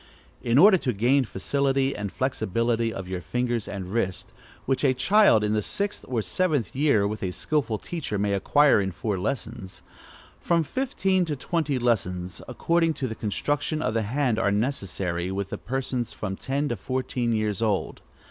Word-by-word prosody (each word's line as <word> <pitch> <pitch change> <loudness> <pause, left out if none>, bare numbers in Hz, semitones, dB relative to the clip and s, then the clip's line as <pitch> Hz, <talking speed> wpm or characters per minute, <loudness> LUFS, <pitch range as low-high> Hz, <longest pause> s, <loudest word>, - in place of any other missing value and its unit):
In 120 +1 +2
order 190 +3 +7
to 125 -5 -1
gain 125 +6 +3
facility 135 +6 0
and 100 -2 -4
flexibility 115 -2 0
of 95 -4 -6
the 90 0 -4
fingers 120 +3 -2
and 95 -1 -6
wrist 95 -6 -2 0.3
(which 135 +1 0
a 130 -2 +3
child 180 - +5
in 105 0 +1
the 105 - +1
sixth 200 - -3
or 120 -4 -1
seventh 155 - 0
year, 130 -8 +3
with 105 +1 -4
a 95 - -1
skilful 115 +3 -1
teacher, 150 -6 -4
may 100 0 0
acquire 140 +5 +4
in 95 -1 -2
four 100 +2 -3
lessons), 110 -3 -5 0.6
from 170 -1 +2
fifteen 195 - 0
to 155 -3 -2
twenty 150 0 -1
lessons, 90 -7 -1
according 165 +5 +1
to 135 -2 -2
the 110 - -4
construction 145 +8 -2
of 110 - 0
the 115 - +1
hand, 120 +1 0
are 105 - +2
necessary 95 -6 -1
with 100 0 -3
persons 125 -2 -2
from 95 -2 -4
ten 140 +7 -2
to 120 - -1
fourteen 125 +2 -2
years 110 -2 -1
old. 105 -4 -1
120 Hz, 170 wpm, -26 LUFS, 105-140 Hz, 0.6 s, order